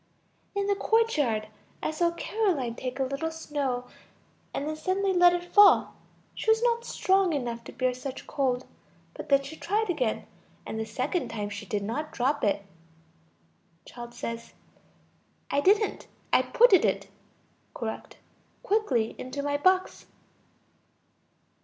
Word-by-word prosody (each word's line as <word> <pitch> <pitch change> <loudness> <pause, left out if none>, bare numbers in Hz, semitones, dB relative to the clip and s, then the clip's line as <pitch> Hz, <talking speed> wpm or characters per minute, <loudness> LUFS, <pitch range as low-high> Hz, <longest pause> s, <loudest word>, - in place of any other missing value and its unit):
In 400 0 0
the 405 - +2
courtyard, 305 - +1 0.4
I - - 0
saw 340 +2 +2
Caroline 340 - -1
take 255 +2 -5
a - - +2
little 275 +5 -2
snow, 285 -6 -3 0.7
and 285 - -3
then 310 - -2
suddenly 380 +4 0
let 355 -1 +7
it 350 0 -1
fall; 410 -1 +7 0.4
she - - -3
was 445 +1 +4
not 470 -1 +2
strong 380 -5 +2
enough 240 -4 -3
to - - -8
bear 255 -1 0
such 255 +1 -7
cold. 260 -2 -1 0.5
But - - -9
then 275 -1 +4
she 280 +3 -8
tried 420 +1 0
again, 255 -9 -1 0.4
and 220 - -4
the 220 - -2
second 260 +10 -2
time 210 -2 -4
she 205 0 -7
did 205 0 -2
not 290 +9 -3
drop 270 +4 0
it. 200 -1 +1 1.2
Child. 240 -1 -10 1.4
I 285 - +2
didn't. 410 +5 +2 0.3
I - - +6
putted 475 -6 +5
it - - 0 0.7
(correct) - - -6 0.5
quickly 285 - +1
into 270 +3 -5
my 285 0 0
box. 370 +5 +1
290 Hz, 140 wpm, -28 LUFS, 250-380 Hz, 1.4 s, let